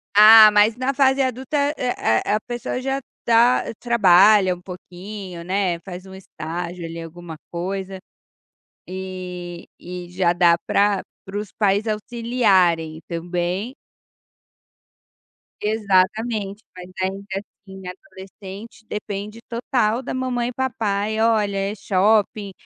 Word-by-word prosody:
Ah, 215 Hz, +1 st, +10 dB
mas 210 Hz, +1 st, +4 dB
na 255 Hz, +2 st, -1 dB
fase 270 Hz, 0 st, +3 dB
adulta 260 Hz, +2 st, -2 dB, 0.2 s
é 250 Hz, -1 st, -1 dB, 0.3 s
é -, -, +1 dB
a 215 Hz, -, +2 dB
pessoa 240 Hz, +2 st, -5 dB
já 270 Hz, +1 st, -1 dB, 0.2 s
tá 235 Hz, +2 st, +4 dB, 0.2 s
trabalha 200 Hz, -4 st, +5 dB
uma 180 Hz, -, -16 dB
pouquinho, 180 Hz, 0 st, -9 dB
né, 185 Hz, -1 st, -1 dB
faz 185 Hz, 0 st, -9 dB
um 190 Hz, -, -12 dB
estágio 175 Hz, -1 st, -6 dB
ali 165 Hz, 0 st, -7 dB
alguma 165 Hz, 0 st, -9 dB
coisa, 190 Hz, +2 st, -4 dB, 0.9 s
e 180 Hz, -2 st, -7 dB
e 180 Hz, 0 st, -8 dB
já 180 Hz, -1 st, +1 dB
dá 175 Hz, -1 st, +4 dB
pra 200 Hz, -1 st, +2 dB, 0.2 s
para 195 Hz, +1 st, -8 dB
os 210 Hz, -1 st, -6 dB
pais 205 Hz, 0 st, +1 dB
auxiliarem 200 Hz, -8 st, +1 dB
também. 175 Hz, +7 st, -3 dB, 1.9 s
Exatamente, 210 Hz, +1 st, 0 dB
mas 180 Hz, 0 st, -9 dB, 0.2 s
aí 190 Hz, -, +1 dB, 0.2 s
que, 190 Hz, -, -3 dB
assim, 195 Hz, -1 st, -14 dB
adolescente 195 Hz, +1 st, -11 dB
depende 210 Hz, +1 st, -5 dB
total 235 Hz, -1 st, 0 dB
da 265 Hz, -, -6 dB
mamãe 250 Hz, -2 st, -1 dB
e 250 Hz, -, -7 dB
papai, 220 Hz, -4 st, -1 dB
olha 215 Hz, -3 st, +2 dB
é 195 Hz, +2 st, -2 dB
shopping, 205 Hz, +1 st, +1 dB
200 Hz, 120 wpm, -22 LUFS, 180-225 Hz, 1.9 s, Ah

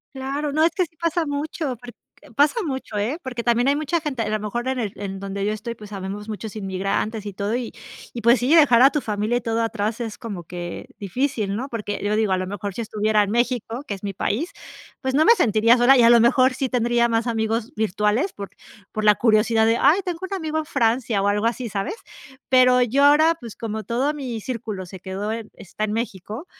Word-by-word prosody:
Claro, 275 Hz, +2 st, -3 dB
no, 310 Hz, +2 st, +3 dB
es 330 Hz, -, +3 dB
que 365 Hz, -, +1 dB
sí 325 Hz, -, -33 dB
pasa 335 Hz, 0 st, 0 dB
mucho 290 Hz, -1 st, -3 dB
porque 240 Hz, +1 st, -12 dB, 0.4 s
pasa 290 Hz, +7 st, +4 dB
mucho, 260 Hz, -7 st, -4 dB
¿eh?, 230 Hz, +9 st, -1 dB
porque 245 Hz, -3 st, -4 dB
también 240 Hz, +2 st, +2 dB
hay 280 Hz, -, +3 dB
mucha 310 Hz, +3 st, 0 dB
gente 295 Hz, -6 st, -4 dB
a 215 Hz, -, -2 dB
lo 215 Hz, 0 st, 0 dB
mejor 240 Hz, +4 st, -3 dB
en 260 Hz, 0 st, -1 dB
el 215 Hz, -5 st, -2 dB
en 195 Hz, -1 st, -6 dB
donde 200 Hz, 0 st, -4 dB
yo 210 Hz, -, +1 dB
estoy, 230 Hz, +2 st, -6 dB
pues 210 Hz, -2 st, -12 dB
habemos 200 Hz, +2 st, -6 dB
muchos 215 Hz, 0 st, -6 dB
inmigrantes 195 Hz, +2 st, -2 dB
y 205 Hz, -, -5 dB
todo 205 Hz, +4 st, -2 dB
y 245 Hz, -2 st, -4 dB, 0.4 s
y 240 Hz, -, -5 dB
pues 235 Hz, +2 st, +4 dB
sí, 260 Hz, +6 st, +3 dB
dejar 270 Hz, -7 st, +6 dB
a 270 Hz, -, +8 dB
tu 295 Hz, -, -1 dB
familia 215 Hz, +1 st, -1 dB
y -, -, -7 dB
todo 230 Hz, 0 st, -1 dB
atrás 225 Hz, 0 st, -2 dB
es 225 Hz, -2 st, -6 dB
como 205 Hz, -7 st, -6 dB
que 175 Hz, 0 st, -7 dB
difícil, 210 Hz, -1 st, -2 dB
¿no?, 260 Hz, +5 st, -4 dB
porque 210 Hz, -3 st, -4 dB
yo 210 Hz, +1 st, +1 dB
digo 215 Hz, -3 st, +1 dB
a 185 Hz, -, +3 dB
lo 185 Hz, 0 st, -3 dB
mejor 200 Hz, 0 st, -5 dB
si 235 Hz, -, -3 dB
estuviera 215 Hz, -1 st, +1 dB
en 200 Hz, -, -2 dB
México, 240 Hz, +2 st, -1 dB
que 205 Hz, -, -3 dB
es 195 Hz, -, -11 dB
mi 200 Hz, -, -2 dB
país, 260 Hz, -, -2 dB, 0.5 s
pues 260 Hz, 0 st, -2 dB
no 310 Hz, +3 st, +4 dB
me -, -, +8 dB
sentiría 230 Hz, -, +4 dB
sola 255 Hz, +3 st, +6 dB
y 245 Hz, -, +5 dB
a 230 Hz, -, +7 dB
lo 235 Hz, -, +7 dB
mejor 255 Hz, +2 st, +4 dB
sí 265 Hz, +1 st, -2 dB
tendría 240 Hz, -1 st, +2 dB
más 225 Hz, +1 st, 0 dB
amigos 225 Hz, +2 st, -1 dB
virtuales 215 Hz, -, 0 dB
por 200 Hz, -1 st, -7 dB, 0.4 s
por 215 Hz, -, -3 dB
la 210 Hz, 0 st, +7 dB
curiosidad 220 Hz, +1 st, +3 dB
de: 225 Hz, +1 st, +3 dB
"Ay, 345 Hz, +7 st, +5 dB
tengo 355 Hz, -2 st, -3 dB
un 375 Hz, +1 st, -4 dB
amigo 315 Hz, -3 st, -2 dB
en 315 Hz, -, -3 dB
Francia" 235 Hz, -6 st, +1 dB
o 200 Hz, -, +2 dB
algo 205 Hz, +2 st, +1 dB
así, 235 Hz, +1 st, -1 dB
¿sabes?, 200 Hz, -, -3 dB, 0.6 s
pero 255 Hz, -1 st, +5 dB
yo 250 Hz, +4 st, +2 dB
ahora, 310 Hz, +3 st, +6 dB
pues 235 Hz, -4 st, -9 dB
como 220 Hz, -2 st, -4 dB
todo 260 Hz, +6 st, 0 dB
mi 255 Hz, -6 st, -5 dB
círculo 215 Hz, -6 st, -5 dB
se 185 Hz, +1 st, -11 dB
quedó 190 Hz, +3 st, -4 dB
en 225 Hz, -1 st, -6 dB
está 215 Hz, +3 st, -5 dB
en 210 Hz, -, -2 dB
México, 225 Hz, -, -5 dB
230 Hz, 235 wpm, -22 LUFS, 210-265 Hz, 0.6 s, a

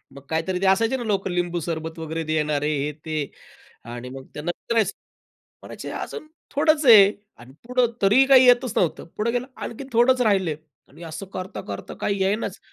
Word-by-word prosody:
मग 140 Hz, -, -10 dB
काहीतरी 165 Hz, +3 st, -1 dB
ते 195 Hz, -, +1 dB
असायचे 225 Hz, +6 st, +1 dB
ना 240 Hz, -, -5 dB
लोकं 200 Hz, -3 st, -1 dB
लिंबू 175 Hz, -1 st, -1 dB
सरबत 160 Hz, 0 st, -5 dB
वगैरे 160 Hz, 0 st, -4 dB
देणारे, 150 Hz, -1 st, 0 dB
हे, 145 Hz, +2 st, -2 dB
ते 155 Hz, -3 st, -2 dB, 0.5 s
आणि 120 Hz, +2 st, -8 dB
मग 135 Hz, 0 st, -9 dB
त्यांना 155 Hz, +4 st, -3 dB
विचारायचं. 225 Hz, -4 st, 0 dB, 0.7 s
म्हणायचे, -, -, -8 dB
"अजून 310 Hz, -, -6 dB, 0.2 s
थोडंच 310 Hz, +1 st, +2 dB
आहे." 210 Hz, -4 st, +9 dB, 0.3 s
आणि 125 Hz, +2 st, -14 dB
पुढं 250 Hz, 0 st, +2 dB, 0.2 s
तरीही 235 Hz, +8 st, +5 dB
काही 260 Hz, -2 st, +7 dB
येतच 245 Hz, -1 st, +4 dB
नव्हतं. 170 Hz, -4 st, 0 dB
पुढे 220 Hz, +2 st, 0 dB
गेलं 245 Hz, +1 st, -2 dB
आणखीन, 265 Hz, +4 st, -7 dB
थोडच 250 Hz, +2 st, +4 dB
राहिले 190 Hz, -8 st, +2 dB, 0.3 s
आणि 160 Hz, +5 st, -15 dB
असं 165 Hz, +4 st, -7 dB
करता, 185 Hz, 0 st, -6 dB
करता 100 Hz, -, -6 dB
काही 200 Hz, -1 st, -1 dB
येईनाच. 200 Hz, +4 st, -1 dB
190 Hz, 175 wpm, -23 LUFS, 160-235 Hz, 0.7 s, आहे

